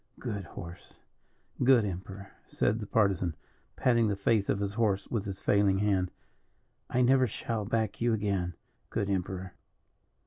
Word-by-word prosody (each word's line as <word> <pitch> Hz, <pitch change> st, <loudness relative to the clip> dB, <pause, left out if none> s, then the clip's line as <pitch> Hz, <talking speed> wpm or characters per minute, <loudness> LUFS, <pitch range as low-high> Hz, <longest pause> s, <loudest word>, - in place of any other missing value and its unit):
"Good 105 Hz, -7 st, -4 dB
horse, 85 Hz, 0 st, -10 dB, 0.7 s
good 125 Hz, -4 st, +6 dB
Emperor," 95 Hz, +1 st, -6 dB, 0.2 s
said 110 Hz, +3 st, 0 dB
the 105 Hz, -, -6 dB
Partisan, 95 Hz, -7 st, +1 dB, 0.4 s
patting 120 Hz, -3 st, +3 dB
the 100 Hz, -, 0 dB
face 100 Hz, +1 st, +1 dB
of 100 Hz, -, +1 dB
his 100 Hz, 0 st, -2 dB
horse 100 Hz, -3 st, +1 dB
with 110 Hz, -4 st, -1 dB
his 95 Hz, -1 st, -5 dB
failing 100 Hz, -2 st, +3 dB
hand. 95 Hz, -3 st, +1 dB, 0.8 s
"I 125 Hz, -, +2 dB
never 130 Hz, +1 st, +5 dB
shall 110 Hz, 0 st, -3 dB
back 110 Hz, 0 st, -1 dB
you 120 Hz, 0 st, +3 dB
again, 100 Hz, -5 st, -1 dB, 0.3 s
good 100 Hz, -, -1 dB
Emperor. 95 Hz, -1 st, -3 dB
100 Hz, 145 wpm, -30 LUFS, 95-115 Hz, 0.8 s, good